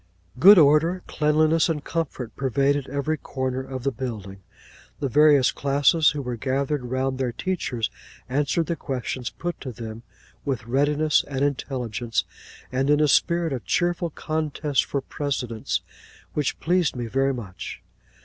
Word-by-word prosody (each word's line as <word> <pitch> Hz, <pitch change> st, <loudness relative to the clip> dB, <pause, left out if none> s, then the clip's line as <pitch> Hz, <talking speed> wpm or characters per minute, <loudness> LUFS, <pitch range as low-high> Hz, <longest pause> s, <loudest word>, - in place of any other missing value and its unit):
Good 200 Hz, +8 st, +9 dB
order, 160 Hz, +4 st, +4 dB
cleanliness, 155 Hz, +2 st, +2 dB
and 150 Hz, -3 st, -2 dB
comfort, 135 Hz, -8 st, -4 dB
pervaded 140 Hz, +1 st, +1 dB
every 145 Hz, +3 st, -1 dB
corner 130 Hz, -2 st, -3 dB
of 130 Hz, -1 st, -6 dB
the 135 Hz, -, +1 dB
building. 110 Hz, -7 st, -6 dB, 0.6 s
The 140 Hz, -, -1 dB
various 145 Hz, -1 st, +5 dB
classes, 145 Hz, +3 st, +3 dB
who 145 Hz, -2 st, -3 dB
were 125 Hz, -1 st, -4 dB
gathered 135 Hz, +2 st, -1 dB
round 130 Hz, +1 st, -1 dB
their 130 Hz, -2 st, 0 dB
teachers, 125 Hz, -, -2 dB, 0.4 s
answered 145 Hz, +5 st, 0 dB
the 170 Hz, -, -2 dB
questions 130 Hz, -4 st, -4 dB
put 175 Hz, 0 st, -5 dB
to 130 Hz, -, -5 dB
them 115 Hz, -1 st, -8 dB, 0.4 s
with 130 Hz, -5 st, -2 dB
readiness 145 Hz, +4 st, +2 dB
and 140 Hz, 0 st, 0 dB
intelligence, 120 Hz, -7 st, -2 dB, 0.5 s
and 135 Hz, +2 st, 0 dB
in 150 Hz, 0 st, +4 dB
a 150 Hz, -, +4 dB
spirit 165 Hz, +4 st, +2 dB
of 125 Hz, -5 st, -4 dB
cheerful 175 Hz, -, 0 dB
contest 155 Hz, -2 st, -1 dB
for 140 Hz, -, -2 dB
precedence 130 Hz, -5 st, -3 dB, 0.5 s
which 150 Hz, -3 st, -1 dB
pleased 175 Hz, -4 st, +1 dB
me 120 Hz, -1 st, -3 dB
very 135 Hz, +4 st, +1 dB
much. 100 Hz, -7 st, -8 dB
140 Hz, 145 wpm, -24 LUFS, 125-150 Hz, 0.6 s, Good